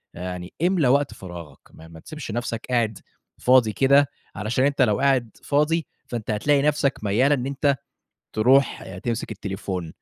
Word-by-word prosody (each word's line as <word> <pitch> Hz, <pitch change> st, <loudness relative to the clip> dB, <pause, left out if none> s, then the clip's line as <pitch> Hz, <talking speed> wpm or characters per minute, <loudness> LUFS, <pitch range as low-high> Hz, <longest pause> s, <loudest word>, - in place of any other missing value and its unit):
آآ، -, -, -9 dB
يعني 90 Hz, 0 st, -6 dB
إملى 175 Hz, -5 st, +3 dB
وقت 140 Hz, +2 st, +2 dB
فراغك، 85 Hz, -4 st, -10 dB
ما 80 Hz, -, -14 dB
ما 80 Hz, 0 st, -13 dB
تسبش 150 Hz, -, -8 dB
نفسك 120 Hz, 0 st, -3 dB
قاعد 115 Hz, -4 st, 0 dB, 0.4 s
فاضي 125 Hz, -4 st, +4 dB
كده، 140 Hz, +1 st, +4 dB, 0.3 s
علشان 110 Hz, +6 st, 0 dB
أنت 140 Hz, 0 st, +1 dB
لو 105 Hz, -4 st, +3 dB
قاعد 130 Hz, -5 st, +1 dB
فاضي، 150 Hz, +2 st, +1 dB, 0.2 s
فأنت 115 Hz, -3 st, -4 dB
هتلاقي 140 Hz, +7 st, +2 dB
نفسك 145 Hz, -1 st, +1 dB
ميال 120 Hz, +8 st, +2 dB
إن 130 Hz, -3 st, +1 dB
أنت 140 Hz, +1 st, +1 dB, 0.6 s
تروح 130 Hz, +5 st, +2 dB
تمسك 115 Hz, -2 st, -3 dB
التليفون. 95 Hz, -4 st, -5 dB
125 Hz, 155 wpm, -23 LUFS, 105-140 Hz, 0.6 s, فاضي